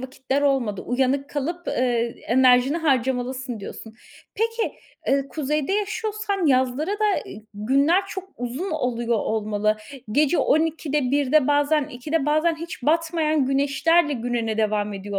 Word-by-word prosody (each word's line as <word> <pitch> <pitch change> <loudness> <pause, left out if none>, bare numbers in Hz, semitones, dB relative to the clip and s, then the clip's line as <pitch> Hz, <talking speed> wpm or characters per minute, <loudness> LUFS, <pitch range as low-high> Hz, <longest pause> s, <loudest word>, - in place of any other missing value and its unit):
vakitler 265 +2 -2
olmadı, 255 -8 +1
uyanık 265 +3 0
kalıp, 340 +5 -3
ııı, - - -2 0.5
enerjini 255 +3 +4
harcamalısın 260 -4 -1
diyorsun. 220 +2 -9 0.4
Peki, 455 +1 -1 0.3
eee, 275 0 +1
kuzeyde 300 +3 -2
yaşıyorsan 415 -2 -1
yazları 260 +4 +1
da, 420 -1 +1
eee, 215 - -10
günler 275 - +2
çok 385 -1 -7
uzun 255 +10 -4
oluyor 240 -6 -1
olmalı. 215 0 0 0.4
Gece 300 +6 +3
12'de, 300 -3 +1
1'de 285 0 +3
bazen, 290 +1 +3
2'de 295 +3 -2
bazen 310 +3 +2
hiç 335 0 -8
batmayan 315 -1 +1
güneşlerle 290 +4 +2
gününe 235 -3 -2
devam 210 -1 0
ediyor 200 0 -4
280 Hz, 125 wpm, -23 LUFS, 245-325 Hz, 0.5 s, enerjini